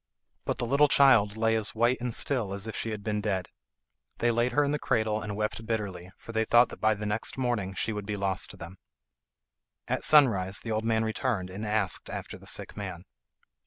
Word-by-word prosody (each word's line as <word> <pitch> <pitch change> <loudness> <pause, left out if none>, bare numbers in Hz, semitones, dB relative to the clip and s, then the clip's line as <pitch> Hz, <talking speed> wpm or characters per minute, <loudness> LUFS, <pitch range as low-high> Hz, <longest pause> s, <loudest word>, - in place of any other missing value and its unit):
But - - -1
the - - -2
little 140 +5 +4
child 110 -8 +5
lay 115 0 +2
as 110 -1 -3
white 120 +3 +2
and 125 -1 -2
still 115 -5 0
as 100 +1 -3
if 115 - -5
she 115 - -2
had 105 -2 -5
been 105 -1 -1
dead. 95 -3 -2 0.7
They 120 +1 +2
laid 120 +2 +1
her 145 +4 +3
in 140 - 0
the 150 - -1
cradle 110 -3 0
and 105 -1 -5
wept 110 +1 -2
bitterly, 100 -6 -3
for - - -10
they 110 0 +1
thought 120 +2 +5
that - - -11
by 110 0 +3
the 105 0 -6
next 105 +4 -2
morning 115 -7 -1
she 110 - -1
would 105 -1 -5
be 105 -1 -2
lost 95 -1 -1
to - - -11
them. 85 +3 -10 1.1
At - - -1
sunrise 100 -11 +5
the 115 - -6
old 110 +1 -1
man 110 0 +2
returned 110 -4 -2
and 105 +3 -5
asked 105 -3 -1
after - - -6
the - - -14
sick - - -1
man. - - -6
110 Hz, 220 wpm, -28 LUFS, 100-120 Hz, 1.1 s, child